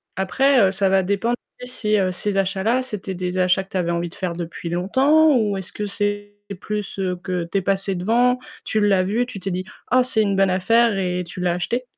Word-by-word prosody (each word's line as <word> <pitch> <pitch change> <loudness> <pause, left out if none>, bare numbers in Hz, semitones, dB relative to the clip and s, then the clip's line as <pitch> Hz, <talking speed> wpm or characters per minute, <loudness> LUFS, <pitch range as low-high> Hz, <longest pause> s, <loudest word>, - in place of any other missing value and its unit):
après, 265 +8 +2
heu, - - -3
ça 195 0 +1
va 190 0 +3
dépendre 200 +5 0 0.3
si, 225 -4 -1 0.2
ces 195 +2 -2
achats-là, 195 +6 +1
c'était 210 -6 -5
des 180 0 -3
achats 185 +1 +2
que 195 - -24
tu 190 - -3
avais 170 -2 0
envie 170 0 -2
de - - -11
faire 180 -2 -3
depuis 170 0 -6
longtemps 270 - +3
ou 210 -3 0
est-ce 190 -1 -7
que 210 - -3
c'est 205 0 -3 0.2
plus 210 -1 -4 0.2
que 180 -2 -2
tu - - +1
es - - -5
passé 195 +1 0
devant, 235 +7 +2 0.2
tu 220 - -1
l'as 200 -3 +3
vu, 215 +6 0
tu 205 - -7
t'es 195 +1 -4
dit: 185 +1 -3 0.3
«Ah, 255 +1 +5
c'est 240 -3 +1
une 200 -1 0
bonne 195 0 +3
affaire», 225 +4 +3
et 180 -1 -1
tu 175 +1 -10
l'as 180 -1 +1
acheté? 235 +8 -2
195 Hz, 220 wpm, -21 LUFS, 185-220 Hz, 0.3 s, Ah